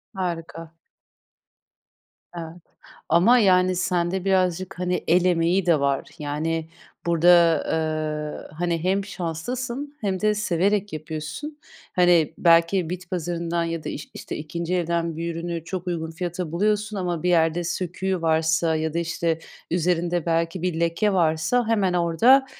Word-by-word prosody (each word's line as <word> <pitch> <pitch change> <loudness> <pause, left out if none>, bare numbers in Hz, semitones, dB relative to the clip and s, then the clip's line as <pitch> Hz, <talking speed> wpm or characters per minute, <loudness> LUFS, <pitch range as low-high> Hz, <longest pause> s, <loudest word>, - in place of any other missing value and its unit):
Harika. 165 -3 -4 1.7
Evet 165 0 -7 0.5
ama, 185 +10 +5
yani, 185 -2 +4
sen 175 -1 0
de 190 0 -3
birazcık, 185 -1 0
hani, 180 0 -1
el 180 +2 +4
emeği 175 +1 +2
de 165 -4 +4
var. 140 -1 0
Yani, 155 +2 -2 0.4
burada, 170 0 +2 0.4
eee, 155 -1 -2
hani, 170 -1 -1
hem 195 +2 +1
şanslısın 240 - -4
hem 195 -3 -1
de 215 0 +3
severek 200 0 0
yapıyorsun. 155 - -6 0.4
Hani, 175 -4 +4
belki 170 +1 +4
bit 180 0 -6
pazarından 170 -1 -2
ya 165 -1 -3
da - - -4
iş 145 - -7
işte, - - -6
2'nci 170 +3 -3
elden 170 -2 -1
bir 170 0 -3
ürünü 170 -1 -4
çok 185 +1 -5
uygun 160 -2 -3
fiyata 175 -1 -4
buluyorsun 210 +3 0
ama 175 -3 -2
bir 180 - +2
yerde 165 0 +2
söküğü 185 +1 -2
varsa 160 0 +2
ya 160 0 -2
da, 170 - 0
işte, 170 -1 -1 0.3
üzerinde 175 0 0
belki 165 +1 0
bir 175 -2 -1
leke 170 +5 +1
varsa 175 +7 +1
hemen 205 -5 +2
orada 225 +11 +4
170 Hz, 140 wpm, -24 LUFS, 165-185 Hz, 1.7 s, ama